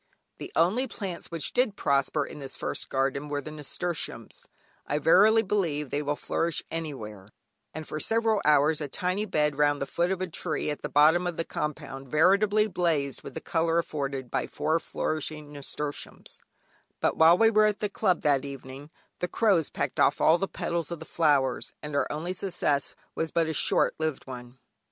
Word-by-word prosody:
The - - -7
only 205 +11 +2
plants 195 -7 -6
which 165 -3 -3
did 245 -5 +2
prosper 140 +1 +1
in 150 - -9
this 135 -2 -6
first - - -4
garden 135 +2 -1
were 145 0 -1
the 155 +2 -7
nasturtiums 155 +3 -4 0.4
(I 145 - 0
verily 210 +9 +5
believe 165 - -1
they 145 - 0
will 145 0 -1
flourish 165 +2 -1
anywhere) 115 -12 -6 0.4
and 155 0 -7
for 155 - -4
several 225 +2 +2
hours 150 +1 +4
a 145 - -2
tiny 185 +8 -2
bed 150 -6 0
round 145 -1 +3
the 140 - -1
foot 175 +5 0
of 190 - -1
a 185 - -1
tree 160 -3 -2
at 150 - -5
the - - -4
bottom 160 +5 +5
of 175 - -4
the 165 - -1
compound 140 -3 -5
veritably 200 +8 +4
blazed 165 -9 -1
with - - -10
the 160 - -4
colour 165 0 +1
afforded 140 -6 -3
by - - -1
four 160 +2 0
flourishing 155 -2 -4
nasturtiums; 145 +1 -6 0.6
but - - +1
while 165 +2 +6
we 225 +1 +5
were 215 -1 +5
at 210 -1 0
the 210 - -1
Club 195 -3 +1
that 140 -2 +2
evening, 140 +1 -8 0.3
the 180 - -1
crows 190 -7 +2
pecked - - -3
off - - +4
all 165 +2 +5
the 195 - 0
petals 170 -4 -3
of 170 - -4
the 160 - -10
flowers, 140 -7 +1
and 150 -1 -5
our 145 - +1
only 165 +5 -3
success 175 -7 -1 0.2
was 160 - -2
but 165 0 +1
a 160 - -2
short - - +2
lived 155 -3 -2
one. 125 -1 -9
155 Hz, 190 wpm, -27 LUFS, 145-180 Hz, 0.6 s, while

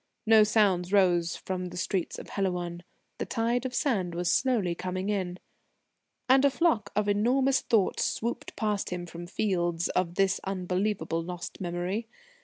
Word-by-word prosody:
No 220 -1 +7
sounds 200 -4 +2
rose 175 -4 +3
from 185 -1 -4
the 175 0 -8
streets 180 0 -2
of - - -9
Helouan. 180 -3 -2 0.4
The - - -3
tide 240 +2 0
of 250 - -8
sand 190 - 0
was 175 +5 +2
coming 235 -10 +1
slowly 185 +3 -3
in. 180 -3 -2 0.9
And 265 +1 +5
a 280 - +6
flock 275 - +1
of 210 0 +1
enormous 255 +6 +2
thoughts 215 -5 +1
swooped 235 +2 -3
past 210 -2 -1
him 180 -1 -4
from 175 0 -8
fields 175 -4 0
of 175 -1 -1
this 195 0 +2
unbelievable, 185 -2 -1
lost 175 +2 -7
memory. 180 +5 -2
190 Hz, 155 wpm, -28 LUFS, 175-220 Hz, 0.9 s, No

